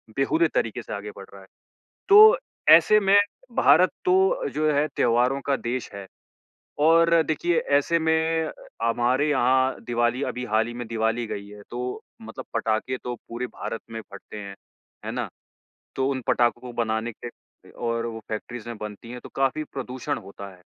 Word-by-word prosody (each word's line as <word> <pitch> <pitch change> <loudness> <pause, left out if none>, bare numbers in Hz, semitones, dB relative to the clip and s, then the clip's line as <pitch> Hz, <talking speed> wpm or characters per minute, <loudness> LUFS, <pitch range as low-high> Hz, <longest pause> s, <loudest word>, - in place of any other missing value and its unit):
बेहूदे 160 +5 +2
तरीके 115 - -1
से - - -7
आगे 105 +1 -6
बढ़ 100 - -9
रहा 100 - -12
है। 95 - -17 0.6
तो 425 +2 +9 0.3
ऐसे 215 0 +7
में 195 0 +4 0.4
भारत - - +5
तो 385 +6 +2
जो 155 0 +1
है 145 +1 +2
त्योहारों 125 +3 +2
का 140 - +2
देश 125 +1 -4
है 100 -1 -8 0.8
और 165 +1 +5
देखिए 160 +2 0 0.2
ऐसे 170 +4 +1
में 160 0 +1 0.3
हमारे 120 +5 +1
यहाँ 130 -1 +2
दिवाली, 120 +2 0
अभी 125 -2 -3
हाल 110 -1 +1
ही 120 - -7
में 120 0 -6
दिवाली 115 +1 -1
गई 100 -1 -6
है। 105 0 -12
तो 125 +1 -4 0.2
मतलब - - -8
पटाखे 110 +3 -1
तो 125 - -3
पूरे 120 +2 -4
भारत 115 - -6
में 115 0 -5
फटते 100 +2 -11
हैं, 100 -1 -8 0.5
है - - -4
ना? - - -3 0.7
तो 130 - +1
उन 135 -1 -2
पटाखों 120 -1 +2
को 125 0 -9
बनाने 115 0 -2
के 120 +2 -14
और 115 -1 -3
वो 115 -1 -6
फैक्ट्रीज़ 115 +2 -6
में 120 - -6
बनती 105 +2 -8
है 125 0 -7
तो - - -11
काफ़ी 135 +3 0
प्रदूषण 130 -3 -5
होता 100 +1 -10
है। - - -23
125 Hz, 175 wpm, -24 LUFS, 115-150 Hz, 0.8 s, तो